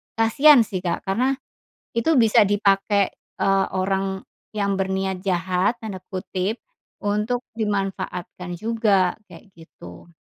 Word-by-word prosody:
kasihan 240 Hz, +4 st, +6 dB
sih 200 Hz, -3 st, -4 dB
Kak 180 Hz, -1 st, -3 dB
karena 250 Hz, +8 st, +1 dB, 0.6 s
itu 230 Hz, +8 st, +2 dB
bisa 220 Hz, -2 st, +5 dB
dipakai, 200 Hz, 0 st, +2 dB, 0.3 s
eee, 195 Hz, 0 st, +3 dB
orang 190 Hz, 0 st, -1 dB, 0.3 s
yang 200 Hz, -2 st, 0 dB
"berniat 190 Hz, 0 st, -2 dB
jahat" 185 Hz, +4 st, 0 dB
tanda 205 Hz, -4 st, -6 dB
kutip 190 Hz, +3 st, -3 dB, 0.4 s
untuk 210 Hz, +4 st, -1 dB
dimanfaatkan 195 Hz, -4 st, -3 dB
juga, 215 Hz, -5 st, +2 dB
kayak -, -, -14 dB
gitu. 90 Hz, -, -13 dB
195 Hz, 110 wpm, -23 LUFS, 190-220 Hz, 0.6 s, kasihan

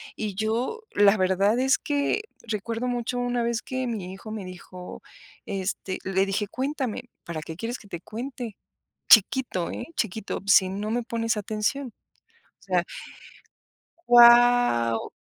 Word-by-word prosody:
y 210 Hz, -3 st, -4 dB
yo, 230 Hz, -, -1 dB
la 205 Hz, +1 st, +5 dB
verdad 195 Hz, +5 st, +2 dB
es 265 Hz, +1 st, +3 dB
que 290 Hz, +8 st, 0 dB, 0.3 s
recuerdo 225 Hz, +3 st, -3 dB
mucho 245 Hz, 0 st, -2 dB
una 245 Hz, -1 st, 0 dB
vez 235 Hz, 0 st, -1 dB
que 260 Hz, 0 st, -3 dB
mi 195 Hz, -6 st, -4 dB
hijo 215 Hz, +3 st, -9 dB
me 215 Hz, -2 st, -5 dB
dijo, 180 Hz, 0 st, -10 dB, 0.4 s
este, 190 Hz, -1 st, -3 dB
le 190 Hz, 0 st, +1 dB
dije: 200 Hz, +1 st, -1 dB
"Cuéntame. 265 Hz, -3 st, -3 dB, 0.2 s
'¿Para 165 Hz, -2 st, -5 dB
qué 160 Hz, +1 st, -8 dB
quieres 230 Hz, +7 st, -4 dB
que 205 Hz, -, -16 dB
te 175 Hz, -3 st, -7 dB
cuente?'". 240 Hz, +1 st, -6 dB, 0.5 s
Chiquito, 220 Hz, -4 st, +4 dB
¿eh? 240 Hz, -, -6 dB
chiquito: 220 Hz, -1 st, -3 dB
"Si 190 Hz, -1 st, +6 dB
no 205 Hz, +3 st, -4 dB
me 240 Hz, +2 st, 0 dB
pones 230 Hz, 0 st, -1 dB
atención". 215 Hz, +5 st, -2 dB, 0.7 s
O -, -, -21 dB
sea -, -, +1 dB, 1.2 s
Guau, 240 Hz, -, +6 dB
220 Hz, 140 wpm, -25 LUFS, 195-245 Hz, 1.2 s, Si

